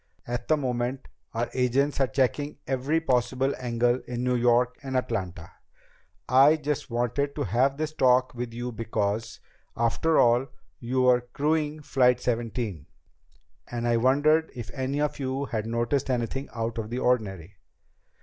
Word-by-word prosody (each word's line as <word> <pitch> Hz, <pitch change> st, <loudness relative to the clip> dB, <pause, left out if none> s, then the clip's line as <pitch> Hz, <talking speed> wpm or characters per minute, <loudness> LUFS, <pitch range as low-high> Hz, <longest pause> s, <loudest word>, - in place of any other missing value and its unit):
At 120 Hz, 0 st, -4 dB
the 155 Hz, -, +3 dB
moment 125 Hz, -1 st, -2 dB, 0.2 s
our 115 Hz, +1 st, -1 dB
agents 135 Hz, +3 st, +1 dB
are 135 Hz, -, +3 dB
checking 140 Hz, +4 st, 0 dB
every 135 Hz, +5 st, 0 dB
possible 130 Hz, -2 st, +1 dB
angle 120 Hz, 0 st, +1 dB
in 120 Hz, 0 st, -3 dB
New 125 Hz, 0 st, +1 dB
York 120 Hz, +1 st, +2 dB
and 135 Hz, -2 st, -2 dB
Atlanta. 90 Hz, -9 st, -3 dB, 0.8 s
I 135 Hz, +4 st, +6 dB
just 150 Hz, -3 st, -3 dB
wanted 120 Hz, +4 st, -1 dB
to -, -, -1 dB
have 125 Hz, +8 st, +1 dB
this 155 Hz, 0 st, -3 dB
talk 130 Hz, -3 st, +3 dB
with 120 Hz, -1 st, -5 dB
you 120 Hz, +1 st, -5 dB
because, 110 Hz, -1 st, -2 dB, 0.4 s
after 120 Hz, +8 st, +1 dB
all, 120 Hz, +3 st, +4 dB, 0.3 s
you 130 Hz, +2 st, 0 dB
were 125 Hz, -1 st, +5 dB
crewing 150 Hz, +4 st, -1 dB
Flight 125 Hz, -3 st, +3 dB
Seventeen, 115 Hz, -, -3 dB, 0.8 s
and 120 Hz, 0 st, -3 dB
I 120 Hz, 0 st, +3 dB
wondered 145 Hz, +6 st, +3 dB
if 120 Hz, -4 st, -7 dB
any 135 Hz, +1 st, -2 dB
of 150 Hz, -1 st, -1 dB
you 135 Hz, +1 st, -2 dB
had 110 Hz, -4 st, -3 dB
noticed 120 Hz, +4 st, -1 dB
anything 130 Hz, +2 st, -2 dB
out 115 Hz, 0 st, -3 dB
of 110 Hz, -1 st, -5 dB
the 120 Hz, -, -3 dB
ordinary." 100 Hz, -8 st, -1 dB
125 Hz, 150 wpm, -26 LUFS, 120-135 Hz, 0.8 s, I